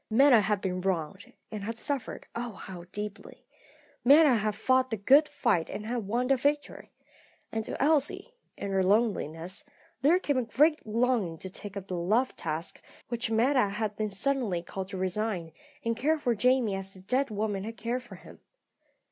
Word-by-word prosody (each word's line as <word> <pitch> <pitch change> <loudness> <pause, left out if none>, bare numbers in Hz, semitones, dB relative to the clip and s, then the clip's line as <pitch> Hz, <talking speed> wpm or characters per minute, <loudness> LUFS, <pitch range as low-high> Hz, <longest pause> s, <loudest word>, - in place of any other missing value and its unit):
Meta 250 0 +6
had 205 -1 0
been 185 -1 -2
wronged, 185 0 -2 0.2
and 210 -2 -5
had 230 +2 -4
suffered, 275 0 -3
oh, 235 -1 -4
how 180 -2 -9
deeply! 210 0 -7 0.6
Meta 285 +2 +7
had 215 -2 0
fought 260 +3 +2
the 225 - -2
good 275 +9 +5
fight 235 - 0
and 210 - -5
had 230 -3 -3
won 240 +4 0
the 270 +1 +3
victory. 290 +3 -1 0.6
And 220 0 -2
to - - -5
Elsie, 300 - +1 0.2
in 200 - -4
her 190 0 +2
loneliness, 190 - 0 0.4
there 310 +6 +5
came 285 -7 0
a - - 0
great 300 +4 +2
longing 225 -6 +1
to 190 +3 -8
take 200 +1 -7
up 195 -1 -7
the 185 - -3
love 215 +10 +1
task 160 +2 -4 0.3
which 235 -1 -2
Meta 235 0 +3
had 210 0 -3
been 215 0 -2
suddenly 205 -4 -1
called 190 +1 -5
to 190 - -6
resign, 185 -2 -2 0.3
and 230 0 +1
care 305 +7 +1
for 250 -5 0
Jamie 250 -1 +2
as 195 0 -5
the 185 - -12
dead 255 +8 0
woman 205 -2 -2
had 225 +2 -7
cared 240 +2 -2
for 245 - -12
him. - - -14
220 Hz, 180 wpm, -29 LUFS, 195-255 Hz, 0.6 s, Meta